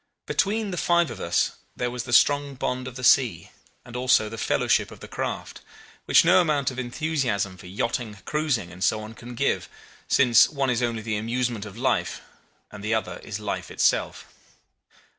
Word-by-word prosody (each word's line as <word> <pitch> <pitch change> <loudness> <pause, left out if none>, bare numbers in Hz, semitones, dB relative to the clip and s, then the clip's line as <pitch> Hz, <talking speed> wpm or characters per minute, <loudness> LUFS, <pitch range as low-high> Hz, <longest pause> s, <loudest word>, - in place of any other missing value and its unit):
Between 210 0 0
the 180 - -4
five 170 -5 +2
of - - -8
us - - +1 0.2
there 125 -1 -2
was 125 0 -5
the 125 - -7
strong 145 +3 +4
bond 130 0 -3
of 130 - -8
the 125 - -7
sea, 115 -10 +3 0.3
and 120 - -11
also 125 -4 +3
the 115 - -7
fellowship - - +1
of - - -12
the - - -10
craft, - - -5 0.4
which - - +5
no - - +6
amount 145 -5 +1
of 130 - -7
enthusiasm 120 - -1
for 90 - -13
yachting, 110 +3 -3
cruising, 150 - -1
and 90 +1 -6
so 110 - +2
on 110 +1 -9
can 120 +1 -10
give, 140 +4 0 0.4
since 120 -5 +5
one 140 -3 0
is 120 0 0
only 115 -2 -1
the 110 -1 -2
amusement 115 -1 -2
of 100 +1 -11
life 120 -9 0 0.5
and 105 -1 -10
the 110 +1 +1
other 90 -5 -3
is 105 -1 -6
life 105 -1 -4
itself. - - 0
120 Hz, 185 wpm, -25 LUFS, 110-135 Hz, 0.5 s, no